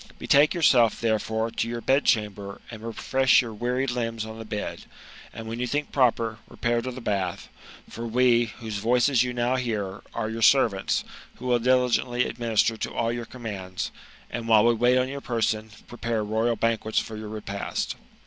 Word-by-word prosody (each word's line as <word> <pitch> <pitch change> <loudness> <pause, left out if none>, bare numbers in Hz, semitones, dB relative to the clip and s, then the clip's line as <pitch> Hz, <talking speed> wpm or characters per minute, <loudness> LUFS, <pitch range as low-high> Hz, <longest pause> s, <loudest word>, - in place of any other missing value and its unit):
Betake 145 +5 +4
yourself, 125 -9 +4
therefore, 110 0 0
to 115 - -2
your 120 0 -3
bed 135 +4 +2
chamber, 100 -2 0
and 110 -2 -9
refresh 130 +4 +2
your 115 -2 -6
wearied 125 +4 -1
limbs 115 -2 -2
on 110 0 -8
the 115 - -7
bed, 105 -1 -5 0.5
and, 115 0 -8
when 115 +1 -5
you 125 - -1
think 145 +4 -2
proper, 115 -4 +1
repair 120 -1 -1
to 130 - -4
the 130 0 -7
bath; 95 -5 -2 0.4
for 115 +1 -6
we, 120 0 +4
whose 110 -3 -5
voices 120 +4 +3
you 125 0 0
now 120 +1 0
hear, 105 -6 -3
are 115 -2 -1
your 110 +1 -4
servants, 110 -5 +3 0.3
who 125 - -11
will 125 -1 +3
diligently 125 0 +2
administer 115 -1 +1
to - - -4
all 115 0 0
your 120 0 -4
commands; 100 -7 -5 0.4
and, 115 -1 -4
while 110 -1 +6
we 120 - +5
wait 120 +2 +3
on 130 0 +2
your 140 +1 -6
person, 110 -3 -1 0.2
prepare 115 -2 -3
royal 110 +3 0
banquets 110 0 -1
for 110 - 0
your 110 0 -7
repast." 105 -2 -4
115 Hz, 180 wpm, -26 LUFS, 110-125 Hz, 0.5 s, while